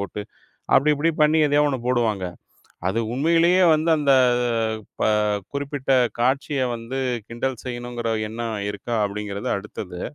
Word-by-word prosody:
போட்டு, 100 +1 -5 0.5
அப்டி 150 +3 +4
இப்டி 150 +3 +1
பண்ணி 155 +1 +4
எதையோ 145 0 +3
ஒண்ண 140 -2 0
போடுவாங்க. 115 -6 +1 0.7
அது 110 +4 -1
உண்மையிலேயே 170 +6 +3
வந்து, 155 +2 +1
அந்த 140 -2 +3 0.9
ப - - +2 0.5
குறிப்பிட்ட 140 -1 -3 0.3
காட்சிய 135 +3 +1
வந்து 115 +3 -5 0.3
கிண்டல் 120 +1 -3
செய்யணுங்கிற 120 -2 -4 0.2
எண்ணம் 115 0 -4
இருக்கா 105 +4 -4
அப்படிங்கிறது 100 0 -4
அடுத்தது. 95 -3 -7
125 Hz, 125 wpm, -23 LUFS, 110-145 Hz, 0.9 s, அப்டி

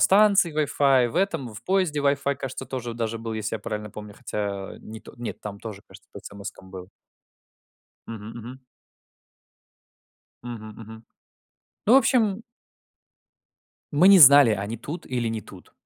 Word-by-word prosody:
станции 200 -4 +4
Wi-Fi, 140 -3 +2
и - - 0
в 155 - -8
этом 165 - 0
в 105 - -10
поезде 185 -5 0
Wi-Fi, 140 0 +1
кажется, 135 -1 -6
тоже 120 -3 -5
даже 115 -1 -3
был, 115 0 -6
если 110 0 -3
я - - -12
правильно 105 -1 -5
помню. 105 0 -10
Хотя, 100 -2 -5
э, - - -14
не, 110 0 -10
то - - -14
нет, 120 -1 -6
там 100 -1 -8
тоже, 105 -3 -8
кажется, - - -17
по - - -9
смс-кам 100 -2 -10
был. 95 0 -10 1.2
Мгм 110 -1 -8
мгм. 125 +3 -10 1.8
Мгм 115 -3 -8
мгм. 110 +1 -12 0.8
Ну, 225 - +5
в - - +9
общем 225 -5 +2 1.5
Мы 150 +5 +4
не 195 -1 +8
знали, 140 -3 +9
они 105 +2 -2
тут 145 +9 -7
или 125 -2 -2
не 110 -1 -3
тут. 95 -3 -15
120 Hz, 160 wpm, -24 LUFS, 105-145 Hz, 1.8 s, в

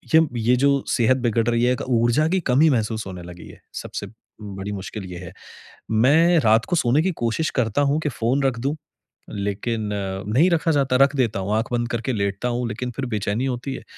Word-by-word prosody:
ये 160 - +8 0.2
ये 120 +3 +3
जो 140 -1 +3
सेहत 125 +2 +3
बिगड़ 115 -2 0
रही 120 0 +1
है, 125 - +3
एक 125 - -4
ऊर्जा 120 +6 +2
की 185 +2 +1
कमी 150 +6 +5
महसूस 110 -2 -1
होने 90 -2 -8
लगी 85 0 -11
है - - -15 0.2
सबसे 100 - -6 0.3
बड़ी 100 0 -6
मुश्किल 100 +1 -6
ये - - -7
है। 85 -2 -9 0.6
मैं 160 +10 +4
रात 110 -3 +3
को 175 - -1
सोने 130 +2 +3
की 190 - +1
कोशिश 120 +8 0
करता 115 +4 0
हूँ 150 - +1
कि 150 - -1
फ़ोन 130 +3 0
रख 130 -4 0
दूँ 140 +4 -1 0.5
लेकिन 105 +2 -3
अ, 95 -1 -3
नहीं 140 - +3
रखा 165 0 +2
जाता 135 -4 +1
है 130 - +3
रख 140 +1 +4
देता 115 -7 0
हूँ, 100 +2 -2
आँख 115 +2 -1
बंद 120 0 0
करके 120 +2 -2
लेटता 100 +3 -2
हूँ, 120 0 -2
लेकिन 120 +2 -4
फ़िर 130 +3 -4
बेचैनी 110 +2 -2
होती 130 +1 -3
है - - -9
120 Hz, 220 wpm, -22 LUFS, 105-135 Hz, 0.6 s, ये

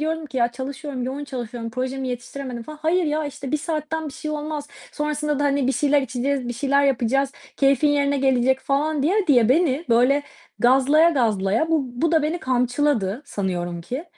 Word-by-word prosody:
diyordum 320 0 -2
ki, 275 - -9
"ya 240 -1 +2
çalışıyorum 270 +1 -5
yoğun 270 +3 -4
çalışıyorum, 240 -3 -6
projemi 260 +2 -3
yetiştiremedim." 250 0 -6
falan. 305 +5 -10
"Hayır 345 +2 +2
ya, 305 +1 0
işte, 275 -1 -7
1 305 - +3
saatten 315 0 -3
bir - - -9
şey 305 - -6
olmaz, 300 -1 -4 0.2
sonrasında 300 -1 -1
da, 290 - +1
hani, 280 -2 +1
bir 270 - +2
şeyler 290 0 +2
içeceğiz, 260 +1 -2
bir 240 - -2
şeyler 280 +3 +2
yapacağız, 270 +1 +1 0.2
keyfin 275 +1 +3
yerine 285 -1 +2
gelecek." 265 0 +2
falan 285 +2 0
diye 380 +6 +2
diye 245 -7 +4
beni 305 +2 +2
böyle, 250 +5 +4 0.4
gazlaya 270 +6 +5
gazlaya, 225 - +1
bu 320 -3 +3 0.2
bu 330 - +2
da 320 -2 +4
beni 315 +4 -1
kamçıladı 250 -3 0
sanıyorum 175 -7 -3
ki. 255 - -5
275 Hz, 180 wpm, -23 LUFS, 250-300 Hz, 0.4 s, gazlaya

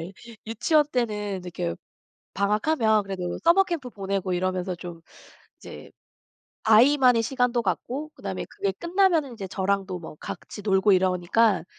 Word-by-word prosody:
예. 170 +4 -7 0.3
유치원 295 +7 +2
때는 210 -6 -2
이렇게 85 - -4 0.6
방학하면 215 +2 +2
그래도 185 -3 -4
써머 345 +4 +5
캠프 325 -9 -4
보내고 195 -3 -3
이러면서 185 0 -1
좀 170 -1 -9 0.6
이제 - - -11 0.7
아이만의 245 +2 +5
시간도 245 0 0
갖고 265 +10 -3
그다음에 - - -5
그게 400 -1 -2
끝나면은 340 -7 +1
이제 195 -3 -6
저랑도 195 -1 -1
뭐 160 -2 -10
같이 205 - -8
놀고 195 0 +3
이러니까 185 +2 +2
210 Hz, 320 characters per minute, -25 LUFS, 185-255 Hz, 0.7 s, 써머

